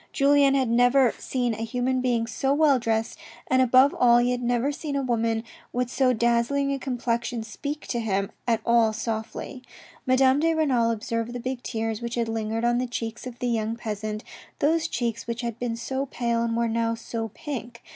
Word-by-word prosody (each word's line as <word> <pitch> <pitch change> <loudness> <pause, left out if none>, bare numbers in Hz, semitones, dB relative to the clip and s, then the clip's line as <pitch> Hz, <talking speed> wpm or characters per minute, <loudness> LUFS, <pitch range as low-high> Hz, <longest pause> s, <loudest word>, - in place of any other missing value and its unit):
Julien 280 -1 +4
had 265 -2 +2
never 245 +2 +4
seen 245 -3 -1
a - - -6
human 250 +3 -1
being 240 -2 +1
so 270 +5 0
well 290 -4 +4
dressed, 225 -1 -1 0.3
and 260 0 +3
above 255 +2 +5
all 240 -1 +5
he 240 +1 +3
had 250 0 -1
never 245 +3 +1
seen 290 0 -5
a 275 - 0
woman 230 -2 0 0.3
with 245 0 -2
so 260 -1 +3
dazzling 240 +4 +1
a 275 - -3
complexion 240 -2 -2
speak 285 +7 -6
to 240 - -1
him 200 -2 -1 0.2
at 230 -2 +2
all 230 -2 +4
softly. 220 +4 -4 0.5
Madame 260 +1 +4
de 325 +1 +2
Renal 260 -7 +2
observed 230 +1 -2
the 245 - -4
big 255 +1 -4
tears 225 -2 -3
which 235 0 -4
had 235 -1 0
lingered 225 +1 -2
on 240 0 +2
the 255 - -1
cheeks 235 0 -5
of 245 -1 -8
the 245 - -2
young 225 -1 -1
peasant, 215 -2 -4 0.3
those 320 +3 +2
cheeks 235 -6 -3
which 235 +1 -3
had 235 -2 -4
been 240 -2 -2
so 265 +4 -3
pale 235 -2 -1
and 230 0 -1
were 235 0 +1
now 230 0 0
so 230 0 -4
pink. 245 -6 -6
240 Hz, 195 wpm, -25 LUFS, 230-260 Hz, 0.5 s, above